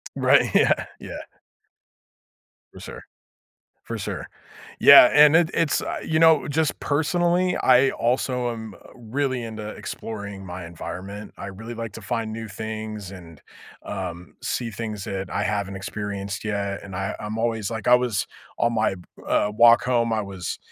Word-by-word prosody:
Right, - - +3
yeah, - - +3
yeah. - - -8 1.5
For - - -13
sure - - -9 0.8
for - - -5
sure, - - -5 0.5
yeah, 140 -3 +9
and, 150 +1 +7
it 165 -1 +4
it's 165 -3 +1 0.2
you 155 - 0
know, 160 -2 +5
just 150 +1 0
personally, 175 +4 +1
I 130 +1 +4
also, 125 0 0
um, 110 -2 -6 0.2
really 130 +1 -2
into 110 -2 -6
exploring 100 -3 -7
my 90 -1 -7
environment. 95 +5 -8
I 100 - -7
really 110 +5 -8
like 115 -1 -5
to - - -10
find 110 -1 -3
new 115 0 -6
things, 110 -1 -6
and, 85 -5 -12 0.4
um, 90 -3 -6
see 115 -2 -2
things 105 -1 -5
that 95 -1 -4
I - - -1
haven't 100 -2 -2
experienced 100 0 -5
yet, 100 -2 -2
and 95 -2 -9
I 95 +1 -3
I'm 105 +1 -5
always 115 -3 -1
like 110 -3 -5
I 125 - +6
was, 125 -5 +2 0.3
on 115 0 +1
my, 110 -3 +1 0.3
uh, 105 - +1
walk 120 0 +7
home, 120 -2 +1
I 110 -1 +1
was, 95 -3 -5
110 Hz, 155 wpm, -24 LUFS, 100-125 Hz, 1.5 s, yeah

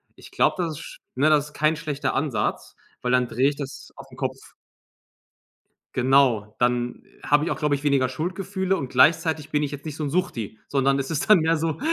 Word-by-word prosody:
Ich - - -15
glaube, - - +2
das 160 -4 -4
ist - - -10 0.2
ne, 140 +4 +3
das 150 -1 +3
ist 150 - -16
kein 155 +1 +2
schlechter 145 -3 -3
Ansatz, 135 -3 -2 0.2
weil 125 - -1
dann 125 -1 +3
drehe 130 +4 +2
ich 145 - -6
das 140 -2 -8
auf - - -11
'n - - -14
Kopf. - - -5 1.4
Genau, 125 -5 +3
dann 120 0 0 0.2
habe 145 +1 +2
ich 170 - -1
auch, - - -3
glaube 150 -2 +1
ich, 140 - -7
weniger 140 -3 +2
Schuldgefühle 190 +7 -2
und 135 -6 -5
gleichzeitig 155 +3 +3
bin 150 - +1
ich 145 -2 -2
jetzt 145 +1 -8
nicht 155 -1 -6
so 155 - -2
'n - - -2
Suchti, 135 - -2
sondern 135 0 +2
es 135 +3 -3
ist 155 +4 -2
dann 210 -4 +8
mehr 165 +1 +2
so, 160 0 -2
145 Hz, 210 wpm, -24 LUFS, 130-160 Hz, 1.4 s, dann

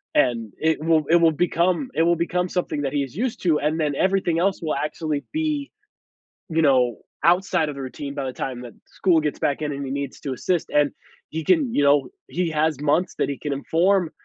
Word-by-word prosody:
and 115 -6 +1
it 160 -1 0
will 160 -1 +3
it 170 - +6
will 165 -1 +5
become 175 - +1
it - - +1
will 170 +1 +3
become 180 +2 -1
something 175 -5 -2
that 135 -1 -2
he 145 -1 +1
is 135 +2 -9
used 245 +2 -2
to, 165 -4 +3
and 155 +3 0
then 150 -2 +1
everything 185 -1 +1
else 190 +2 +1
will 155 -2 -1
actually 150 0 -2
be, 305 -2 -1 0.8
you 165 0 +1
know, 125 -6 +3 0.3
outside 175 -3 +3
of 145 - -6
the 140 - -6
routine 140 +2 -6
by 140 -1 -3
the 130 - -4
time 130 -2 -4
that 120 -2 -9
school 175 -4 +2
gets 150 -1 -2
back 140 +1 0
in 150 -1 -1
and 140 -1 -4
he 130 - -5
needs 140 -1 -4
to 135 -3 -3
assist, 175 +6 -1
and 145 -1 +3 0.4
he 160 +1 -4
can, 285 - +2
you 145 - +2
know 140 0 +4 0.2
he 180 -1 -1
has 155 -2 +1
months 155 +5 +1
that - - 0
he 140 - -4
can 145 -2 -2
inform 170 +5 +1
155 Hz, 225 wpm, -23 LUFS, 140-175 Hz, 0.8 s, it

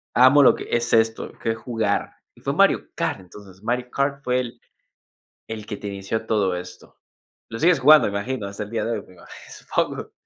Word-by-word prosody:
Amo 130 +3 +7
lo 140 - +6
que - - -7
es 120 0 0
esto, 115 0 +2
qué 115 - 0
es 115 - -4
jugar. 110 -3 -2 0.2
Y - - -20
fue - - -2
Mario - - +3
Kart, - - -2
entonces. 95 +1 -15
Mario 125 +2 -2
Kart 140 0 -1
fue 125 0 +1
el 120 -2 -6 0.9
el 110 -1 -6
que 105 -1 -6
te 105 - -7
inició 100 +3 -4
todo 100 -5 +1
esto. 90 0 -10 0.5
Lo 115 - -6
sigues 165 +4 +4
jugando, 150 +4 +7
me - - -3
imagino, 125 0 -4
hasta 100 +1 -7
el 105 - -10
día 115 0 -2
de 115 - -2
hoy, 110 -3 -3
me 95 - -17
imagi 85 - -16 0.2
supongo. - - -3
110 Hz, 210 wpm, -23 LUFS, 100-125 Hz, 0.9 s, Amo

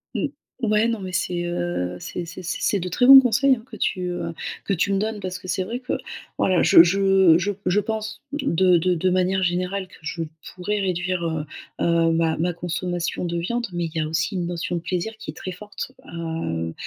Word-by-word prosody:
Mmh. - - 0 0.3
Ouais, 215 0 +3
non 230 -2 -1
mais 185 -1 -6
c'est, 175 0 -1
heu, 175 - -2
c'est 175 - -5
c'est 180 +2 -9
c'est 170 -1 -2
c'est 200 - +1
de 180 - -3
très 245 +8 +2
bons 270 0 +12
conseils, 265 +2 +3
hein, 225 - -12
que - - -8
tu, 185 - -1
heu, 175 -1 -4 0.3
que 200 - 0
tu 195 +2 +1
me 195 - +2
donnes. 215 0 -2
Parce 185 -1 -4
que 185 - -11
c'est 185 0 0
vrai 230 +6 -4
que, 255 0 -4 0.4
voilà, 185 -2 +3
je 165 - +9
je 190 -2 +5
je 200 +4 -1
je 180 +3 +3
pense 220 +1 -4
de 190 - +3
de 180 +2 +2
de 180 +2 +1
manière 185 +1 +1
générale 185 +2 -1
que - - -17
je 160 +1 -4 0.3
pourrais 205 +3 -2
réduire, 180 -1 -1
heu 160 -2 -2 0.4
heu, 165 -1 +3
ma 165 -1 +2
ma 175 +3 0
consommation 175 +1 -3
de 170 -1 -2
viande, 235 +8 -2
mais 175 -1 -2
il 165 - -5
y 160 - +1
a 155 - -1
aussi 160 +6 -1
une 175 -2 -1
notion 175 0 -3
de 170 - -2
plaisir 180 +5 -2
qui 225 - -7
est - - -17
très 185 - -6
forte, 210 +6 -7 0.2
heu 160 - -3
180 Hz, 225 wpm, -23 LUFS, 170-200 Hz, 0.4 s, bons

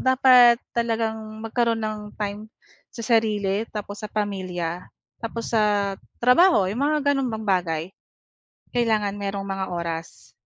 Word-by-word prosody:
dapat 255 -2 +6 0.2
talagang 225 -1 -1 0.2
magkaroon 230 0 0
ng 215 0 -3 0.2
time, 210 +1 -4 0.4
sa 230 - -8 0.2
sarili 210 -2 -1
tapos 205 -1 -6
sa 210 - -6
pamilya, 185 -4 -3 0.4
tapos 230 +1 -5
sa 205 -2 +2 0.2
trabaho, 250 - +5
'yong 210 +8 -3
mga 290 -1 +2
gano'ng 270 -2 0
bang 220 0 -5
bagay, 175 -5 0 0.9
kailangan 215 -4 +1
merong 200 0 -3
mga 195 0 -2
oras. 170 -1 -5
215 Hz, 125 wpm, -24 LUFS, 195-235 Hz, 0.9 s, dapat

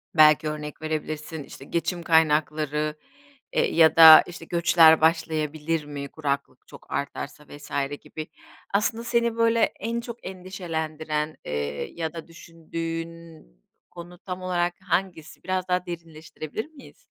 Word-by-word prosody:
belki 155 -1 +6
örnek 150 0 -7
verebilirsin, 155 0 -4
işte, 135 - -12
geçim 170 +2 -2
kaynakları, 155 -1 +2 0.6
eee, - - +1
ya 160 -1 +6
da, 160 -1 +11
işte, 170 -1 -9
göçler 160 -2 +5
başlayabilir 160 -1 0
mi, 145 -1 -6
kuraklık 140 -4 -4
çok - - -15
artarsa 140 +1 -5
vs. 145 0 -12 0.3
gibi. 155 0 -8 0.5
Aslında 220 +3 0
seni 235 -1 +1
böyle 230 0 +3 0.2
en 230 +3 -2
çok 235 0 -9
endişelendiren, 160 -5 -4
eee, 75 0 -3
ya 160 -1 -4
da 165 0 -8
düşündüğün 165 0 -7 0.5
konu 175 +1 -11
tam 185 -1 -6
olarak 175 -1 -1
hangisi? 180 -4 -3
Biraz 185 0 -2
daha 180 0 0
derinleştirebilir 165 +2 -7
miyiz? 295 -4 -16
160 Hz, 125 wpm, -25 LUFS, 155-175 Hz, 0.6 s, da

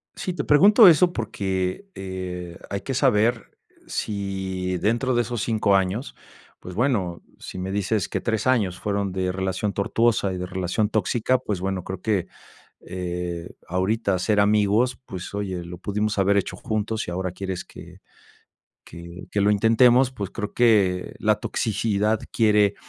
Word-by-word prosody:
Sí, 185 - -3
te - - -3
pregunto 200 - +7
eso 175 +2 +5
porque, 95 - -2
eh, 90 -2 -6
hay 100 -1 -3
que 135 - -4
saber 120 -3 +1 0.3
si 95 -3 -3
dentro 120 +6 +1
de 120 - +3
esos 120 -1 -3
5 110 -3 +2
años, 95 +6 -1 0.4
pues 90 - -9
bueno, 100 -8 0 0.2
sí - - -8
me 95 +1 -4
dices 100 +1 0
que - - -2
3 110 -1 -1
años 105 -9 +2
fueron 100 -1 -1
de 95 -1 -1
relación 95 +2 -2
tortuosa 105 0 +1
y 90 - -4
de 90 - -3
relación 95 +4 -1
tóxica, 110 +4 +1
pues 105 -7 -3
bueno, 95 -1 -2
creo 95 0 -6
que, 105 -5 0 0.6
eh, 90 -2 -4 0.2
ahorita 95 +2 0
ser 105 +3 +1
amigos, 105 +4 +2
pues 95 -5 -7
oye, 95 -3 -3
lo 85 +1 -8
pudimos 105 +3 -2
haber 100 +1 +3
hecho 100 - -2
juntos 110 0 -2
y - - -4
ahora 90 0 -2
quieres 95 -1 -5
que - - -13 0.9
que 85 +2 -10
que 100 - +1
lo 100 - +3
intentemos, 120 +5 +4
pues, 105 -6 -5
creo 105 -2 -5
que 100 -7 +2
la 105 0 +3
toxicidad 110 -1 0
quiere 105 -3 +3
100 Hz, 155 wpm, -24 LUFS, 95-115 Hz, 0.9 s, pregunto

